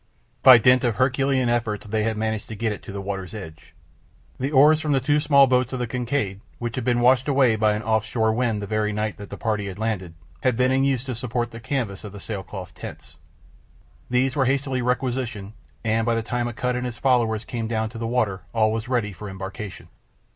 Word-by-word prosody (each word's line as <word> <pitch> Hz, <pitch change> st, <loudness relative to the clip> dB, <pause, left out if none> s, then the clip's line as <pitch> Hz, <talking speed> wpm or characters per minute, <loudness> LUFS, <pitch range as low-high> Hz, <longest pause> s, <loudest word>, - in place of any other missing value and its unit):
By 130 Hz, -2 st, +10 dB
dint 125 Hz, +2 st, +4 dB
of 120 Hz, -4 st, +1 dB
Herculean 130 Hz, +1 st, +2 dB
efforts 115 Hz, -3 st, -1 dB
they 110 Hz, +1 st, -1 dB
had 110 Hz, 0 st, -1 dB
managed 110 Hz, -1 st, -2 dB
to 110 Hz, -, -7 dB
get 110 Hz, +1 st, -1 dB
it 105 Hz, -, -6 dB
to -, -, -9 dB
the 100 Hz, 0 st, -5 dB
water's 95 Hz, -1 st, -5 dB
edge. 80 Hz, -7 st, -10 dB, 0.6 s
The 135 Hz, +3 st, -1 dB
oars 150 Hz, +2 st, +6 dB
from 155 Hz, -2 st, 0 dB
the 135 Hz, -, +3 dB
two 145 Hz, +3 st, +2 dB
small 140 Hz, -2 st, +6 dB
boats 130 Hz, 0 st, +1 dB
of -, -, -1 dB
the 125 Hz, -, 0 dB
Kincaid, 120 Hz, -4 st, -2 dB, 0.2 s
which 120 Hz, -1 st, -4 dB
had 130 Hz, -, -2 dB
been 120 Hz, -1 st, +1 dB
washed 130 Hz, +2 st, +4 dB
away 135 Hz, -5 st, +4 dB
by 110 Hz, -1 st, +2 dB
an 105 Hz, +1 st, -3 dB
off 110 Hz, -1 st, +1 dB
shore 110 Hz, 0 st, 0 dB
wind 115 Hz, -3 st, 0 dB
the -, -, -2 dB
very 105 Hz, +1 st, 0 dB
night 105 Hz, 0 st, -2 dB
that 100 Hz, -1 st, -9 dB
the -, -, -7 dB
party 105 Hz, -3 st, -1 dB
had 95 Hz, -1 st, -6 dB
landed, 100 Hz, -6 st, -3 dB, 0.3 s
had 125 Hz, -3 st, +1 dB
been 130 Hz, 0 st, +3 dB
in 135 Hz, +1 st, +2 dB
use 135 Hz, -3 st, +1 dB
to 130 Hz, -1 st, -4 dB
support 120 Hz, 0 st, -2 dB
the 115 Hz, -, -8 dB
canvas 115 Hz, -5 st, -3 dB
of 105 Hz, -2 st, -8 dB
the 100 Hz, -, -8 dB
sailcloth 95 Hz, -2 st, -6 dB
tents. -, -, -10 dB, 0.9 s
These 125 Hz, +1 st, +1 dB
were 135 Hz, -3 st, +2 dB
hastily 135 Hz, -1 st, 0 dB
requisitioned, 125 Hz, -4 st, -2 dB, 0.3 s
and 115 Hz, 0 st, +1 dB
by 115 Hz, 0 st, +1 dB
the 115 Hz, -, -1 dB
time 120 Hz, +1 st, -2 dB
Akut 125 Hz, +1 st, -2 dB
and 125 Hz, 0 st, -2 dB
his 120 Hz, -1 st, -6 dB
followers 115 Hz, -4 st, +1 dB
came 115 Hz, -3 st, -4 dB
down 110 Hz, -1 st, -1 dB
to 115 Hz, 0 st, -9 dB
the 115 Hz, -, -2 dB
water 110 Hz, -6 st, 0 dB
all 110 Hz, -1 st, +3 dB
was 110 Hz, +1 st, -3 dB
ready 120 Hz, -5 st, 0 dB
for 105 Hz, +2 st, -8 dB
embarkation. 95 Hz, +2 st, -7 dB
115 Hz, 225 wpm, -24 LUFS, 105-125 Hz, 0.9 s, By